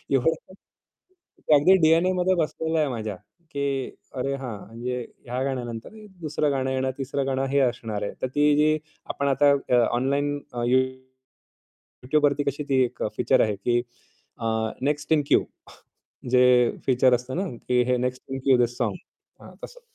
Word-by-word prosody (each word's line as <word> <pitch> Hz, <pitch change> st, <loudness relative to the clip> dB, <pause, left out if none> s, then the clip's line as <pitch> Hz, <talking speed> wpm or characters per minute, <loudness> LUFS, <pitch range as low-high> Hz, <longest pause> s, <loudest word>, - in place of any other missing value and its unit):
एवढं 135 Hz, +5 st, +3 dB, 1.2 s
ते 155 Hz, -, +8 dB
अगदी 150 Hz, +6 st, +6 dB
डी-एन-एमध्ये 180 Hz, +3 st, +3 dB
बसलेलं 160 Hz, -1 st, -1 dB
आहे 150 Hz, -, +2 dB
माझ्या, 110 Hz, -4 st, -4 dB, 0.4 s
की 140 Hz, -2 st, -2 dB, 0.2 s
"अरे, 135 Hz, +1 st, -2 dB
हां 125 Hz, -6 st, -6 dB
म्हणजे 120 Hz, +3 st, -4 dB, 0.3 s
ह्या 125 Hz, +2 st, -3 dB
गाण्यानंतर 120 Hz, -4 st, -4 dB, 0.3 s
दुसरं 150 Hz, -1 st, 0 dB
गाणं 130 Hz, -1 st, -1 dB
येणार, 130 Hz, 0 st, 0 dB
तिसरं 140 Hz, 0 st, -2 dB
गाणं 135 Hz, 0 st, 0 dB
हे 140 Hz, -, +3 dB
असणार 115 Hz, -5 st, -1 dB
आहे." 100 Hz, -, -3 dB
तर -, -, 0 dB
ती 145 Hz, 0 st, +4 dB
जी 155 Hz, +1 st, +3 dB, 0.3 s
आपण 140 Hz, -, -2 dB
आता 140 Hz, +1 st, +4 dB, 0.2 s
अ, 125 Hz, -, +4 dB, 0.2 s
ऑनलाईन 140 Hz, +4 st, 0 dB, 0.2 s
अ, 120 Hz, -, -3 dB
YouTubeवरती 130 Hz, +1 st, -1 dB, 1.2 s
कशी 145 Hz, +2 st, -6 dB
ती 135 Hz, -2 st, +3 dB
एक 120 Hz, -, -5 dB
फीचर -, -, +3 dB
आहे 105 Hz, -2 st, +1 dB
की 120 Hz, +5 st, +1 dB, 0.6 s
अ, -, -, -7 dB, 0.4 s
नेक्स्ट 145 Hz, +2 st, -1 dB
इन 155 Hz, -2 st, +4 dB
क्यू -, -, +4 dB, 0.9 s
जे 125 Hz, 0 st, +5 dB, 0.4 s
फीचर 130 Hz, -1 st, +4 dB
असतं 125 Hz, +2 st, -5 dB
ना, 195 Hz, -, -1 dB, 0.2 s
की 125 Hz, 0 st, +3 dB
हे 125 Hz, 0 st, +1 dB
next 125 Hz, +1 st, -3 dB
in 135 Hz, -, -3 dB
Q 130 Hz, -2 st, +5 dB
this 120 Hz, 0 st, 0 dB
song. -, -, -1 dB, 0.5 s
हां. -, -, -13 dB
तसं. -, -, -9 dB
130 Hz, 160 wpm, -25 LUFS, 125-145 Hz, 1.2 s, ते